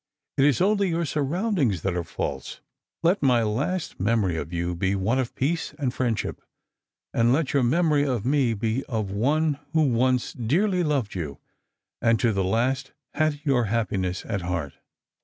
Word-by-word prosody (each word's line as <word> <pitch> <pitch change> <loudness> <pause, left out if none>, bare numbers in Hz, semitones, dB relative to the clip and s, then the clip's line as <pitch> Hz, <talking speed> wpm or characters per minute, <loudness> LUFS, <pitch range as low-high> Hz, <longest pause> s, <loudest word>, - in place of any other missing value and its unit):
It 135 - +4
is 145 +2 +3
only 200 0 +3
your 170 0 0
surroundings 150 - 0
that 95 - 0
are 90 - -1
false. 70 -4 -5 0.4
Let 175 +4 +3
my 125 -4 +4
last 140 +12 -2
memory 100 -3 +1
of 80 0 -4
you 85 0 -2
be 95 +3 0
one 105 +7 +1
of 125 -3 -3
peace 155 +3 -1
and 135 -5 -1
friendship, 120 -4 -2 0.7
and 115 +1 +3
let 145 +2 +1
your 140 - +3
memory 150 +3 +3
of 120 -6 -1
me 130 -4 +2
be 115 +5 -1
of 110 -6 -3
one 145 +8 +1
who 160 -1 +4
once 125 +1 +1
dearly 180 - +1
loved 140 -9 0
you, 75 -7 -4 0.6
and 115 -2 +3
to 115 -2 +2
the 95 -1 0
last 130 +8 0 0.2
had 155 -2 0
your 135 -6 +2
happiness 95 -4 -1
at 100 -4 -2
heart." 85 -5 -3
125 Hz, 170 wpm, -25 LUFS, 100-150 Hz, 0.7 s, It